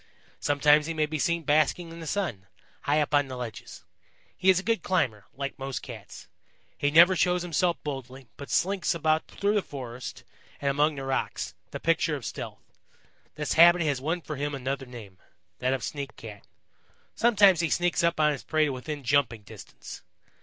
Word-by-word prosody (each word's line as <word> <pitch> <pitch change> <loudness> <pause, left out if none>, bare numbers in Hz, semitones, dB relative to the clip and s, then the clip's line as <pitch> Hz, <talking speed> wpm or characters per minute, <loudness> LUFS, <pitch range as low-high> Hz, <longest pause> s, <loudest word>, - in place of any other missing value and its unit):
Sometimes 150 +1 +3
he 165 - -3
may 155 -1 +2
be 155 0 -4
seen 170 +2 0
basking 155 +3 +1
in 165 - -9
the 165 - -7
sun, 150 - -2 0.3
high 145 +2 +2
up 150 0 -1
on 145 -1 +3
the 130 -1 -6
ledges. 120 -3 -8 0.5
He 190 - +2
is 185 -1 +6
a - - -7
good 230 +1 0
climber, 115 - -1
like 140 +1 -5
most 135 0 -4
Cats. - - -10 0.5
He 145 - 0
never 170 +5 +7
shows 180 +1 +2
himself 175 0 +1
boldly, 135 -2 -6
but 140 - -9
slinks 190 -1 +1
about 155 -1 +1
through 200 +1 -1
the 210 - +2
forest 125 -6 -8 0.4
and 140 -1 +1
among 150 +2 +2
the 135 - -6
rocks, 135 0 -2 0.2
the - - -6
picture 165 -1 +1
of 135 -6 -7
stealth. - - -8 0.6
This 150 -1 -2
habit 175 +1 +7
has 145 -4 0
won 165 +5 -1
for 150 -2 -6
him 145 +1 -2
another 135 0 -4
name 105 -7 -11 0.4
that 130 +1 +1
of 135 - -1
Sneak 140 -2 -5
Cat. 105 -3 -11 0.7
Sometimes 205 -6 +5
he 165 -1 +1
sneaks 175 -1 +1
up 170 -1 +1
on 150 -1 +4
his 140 - -5
prey 155 0 +2
to 145 - -1
within 140 +3 -6
jumping 120 -4 +1
distance. - - -11
150 Hz, 190 wpm, -27 LUFS, 135-170 Hz, 0.7 s, never